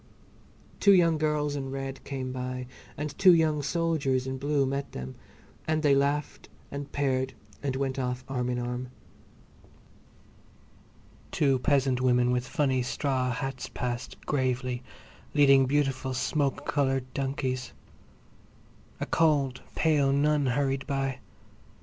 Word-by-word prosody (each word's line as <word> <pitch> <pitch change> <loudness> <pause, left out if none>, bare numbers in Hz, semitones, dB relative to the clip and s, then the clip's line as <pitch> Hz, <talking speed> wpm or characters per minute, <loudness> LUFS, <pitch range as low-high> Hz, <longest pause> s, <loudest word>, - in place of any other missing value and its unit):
Two 200 - +6
young 165 -4 +4
girls 150 -1 0
in 135 -2 -4
red 135 0 -5
came 130 -2 -4
by 125 0 -4 0.3
and 150 -1 -4
two 185 -3 +8
young 155 -2 +2
soldiers 145 -4 0
in 130 0 -4
blue 145 0 +1
met 140 +1 -3
them, 65 0 -6 0.5
and 155 0 +1
they 145 -2 +5
laughed 140 +2 0 0.2
and 140 0 -6
paired 130 -2 0 0.3
and 135 -2 -2
went 135 0 -1
off 125 0 -2
arm 125 -2 -2
in 125 - -1
arm. 125 +1 -3 2.4
Two 135 -3 +2
peasant 135 -2 +2
women 125 -1 +3
with 125 0 0
funny 135 -3 +1
straw 130 0 -1
hats 130 +1 -4
passed, 125 +1 -4
gravely, 130 -3 -1 0.5
leading 135 -2 +6
beautiful 135 -2 0
smoke 145 +2 0
coloured 135 -2 +1
donkeys. 130 -2 -2 1.3
A - - -2
cold, 145 -6 +2
pale 150 -4 +3
nun 145 0 +2
hurried 135 +1 0
by. 135 -1 -1
135 Hz, 125 wpm, -28 LUFS, 130-145 Hz, 2.4 s, two